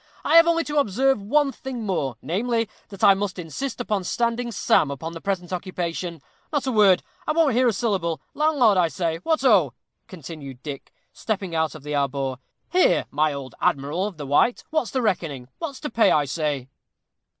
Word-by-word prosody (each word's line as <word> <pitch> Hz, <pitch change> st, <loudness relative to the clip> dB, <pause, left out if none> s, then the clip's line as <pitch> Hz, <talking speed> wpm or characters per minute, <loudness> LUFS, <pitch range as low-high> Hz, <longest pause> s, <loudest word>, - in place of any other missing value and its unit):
"I -, -, +2 dB
have 335 Hz, 0 st, +8 dB
only 335 Hz, 0 st, +3 dB
to 295 Hz, -1 st, 0 dB
observe 265 Hz, +1 st, +2 dB
one 280 Hz, +7 st, +2 dB
thing 255 Hz, -2 st, -6 dB
more, 140 Hz, -, -1 dB
namely, 230 Hz, +6 st, 0 dB, 0.2 s
that 195 Hz, -3 st, -9 dB
I 200 Hz, -, +8 dB
must 195 Hz, -1 st, -3 dB
insist 205 Hz, -, -5 dB
upon 210 Hz, -5 st, -1 dB
standing 235 Hz, +4 st, -1 dB
Sam 155 Hz, -7 st, +2 dB
upon 150 Hz, +4 st, -5 dB
the 165 Hz, -, -8 dB
present 190 Hz, -3 st, -3 dB
occasion. 175 Hz, -3 st, -4 dB, 0.3 s
Not 290 Hz, -4 st, 0 dB
a 260 Hz, -, 0 dB
word. 200 Hz, -5 st, +5 dB, 0.2 s
I 310 Hz, -, +2 dB
won't 315 Hz, -5 st, +3 dB
hear 250 Hz, +2 st, +3 dB
a -, -, +4 dB
syllable. 190 Hz, -6 st, -1 dB
Landlord, 280 Hz, -10 st, +3 dB
I 175 Hz, -, +4 dB
say 165 Hz, +1 st, -2 dB
what 310 Hz, -, 0 dB
oh!" 180 Hz, -, +4 dB, 0.3 s
continued 145 Hz, -6 st, -9 dB
Dick, 145 Hz, -3 st, -7 dB, 0.2 s
stepping 195 Hz, -5 st, -3 dB
out 160 Hz, -1 st, 0 dB
of 155 Hz, -, -11 dB
the 150 Hz, 0 st, -5 dB
arbor. 135 Hz, -2 st, -1 dB, 0.3 s
"Here, 365 Hz, +2 st, +3 dB
my 150 Hz, +2 st, +2 dB
old 140 Hz, -2 st, -7 dB
Admiral 150 Hz, +8 st, 0 dB
of 195 Hz, -6 st, -9 dB
the 145 Hz, -, -6 dB
White, 145 Hz, -, +2 dB
what's 310 Hz, -8 st, 0 dB
the 260 Hz, -2 st, -1 dB
reckoning? 160 Hz, -, -2 dB
what's 285 Hz, -6 st, -5 dB
to 300 Hz, -, -3 dB
pay, 225 Hz, 0 st, +4 dB
I 150 Hz, -1 st, +3 dB
say?" 145 Hz, -3 st, -2 dB
190 Hz, 190 wpm, -24 LUFS, 155-245 Hz, 0.3 s, have